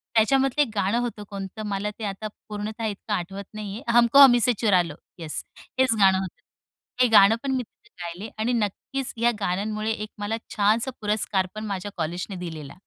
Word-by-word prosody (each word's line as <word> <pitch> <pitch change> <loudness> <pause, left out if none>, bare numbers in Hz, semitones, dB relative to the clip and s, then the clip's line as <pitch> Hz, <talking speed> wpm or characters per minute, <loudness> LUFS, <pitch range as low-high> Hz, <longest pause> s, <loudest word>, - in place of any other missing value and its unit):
त्याच्यामधलं 270 +5 +3
एक 275 - +2
गाणं 200 +4 +1
होतं, 235 -4 -3
कोणतं? 200 +1 -6
मला 200 0 -2
ते - - -6
आता 200 +2 -4 0.2
पूर्णतः 215 +2 -4
इतकं 210 0 -4
आठवत 195 +1 -3
नाही 210 -2 -6
आहे. 240 - -8
हमको 240 +4 +6
हमी 255 -3 +9
से 245 +1 +3
चुरालो, 180 -8 +2 0.2
येस. 160 -2 -5 0.4
हेच 260 -3 +4
गाणं 190 -1 +6
होतं. 190 -2 -6 0.6
हे 250 - +5
गाणं 215 0 +7
पण 275 - -1
मी 255 - -1
तिथं 420 - -27
गायले 175 +6 -6
आणि 230 +3 0
नक्कीच 240 +4 -2
या 235 +1 +3
गाण्यांमुळे 210 +3 -1
एक 215 -1 -4
मला 210 +2 -2 0.2
छानसा 220 +5 +2
पुरस्कार 205 -3 0
पण 215 0 -5
माझ्या 200 -1 -4
कॉलेजने 175 +4 -3
दिलेला. 160 -5 -7
210 Hz, 180 wpm, -25 LUFS, 195-230 Hz, 0.6 s, हमी